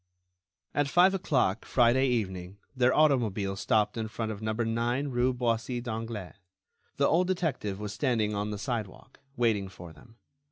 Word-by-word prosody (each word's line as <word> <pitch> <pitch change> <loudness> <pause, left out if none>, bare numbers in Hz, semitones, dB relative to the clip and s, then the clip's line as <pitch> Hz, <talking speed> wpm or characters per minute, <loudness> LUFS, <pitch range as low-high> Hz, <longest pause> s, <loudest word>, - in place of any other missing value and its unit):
At 145 -1 +1
five 175 +5 +5
o'clock, 130 - +1
Friday 130 +2 +3
evening, 95 -6 -2 0.2
their 125 0 +3
automobile 115 -11 +2
stopped 105 +3 +1
in 110 -1 -2
front 110 0 -4
of 105 -1 -7
number 110 +1 -1
nine 120 +5 -1
rue 125 0 +2
Boissy 120 -1 -1
d'Anglas. 115 -5 -5 0.6
The 140 - +3
old 175 +3 +3
detective 160 - -2
was 105 -1 -5
standing 110 -3 0
on 105 +1 -2
the 105 - -4
sidewalk, 115 +1 -5 0.2
waiting 110 -5 +1
for 90 -3 -11
them. 115 +7 -18
115 Hz, 155 wpm, -29 LUFS, 105-130 Hz, 0.6 s, five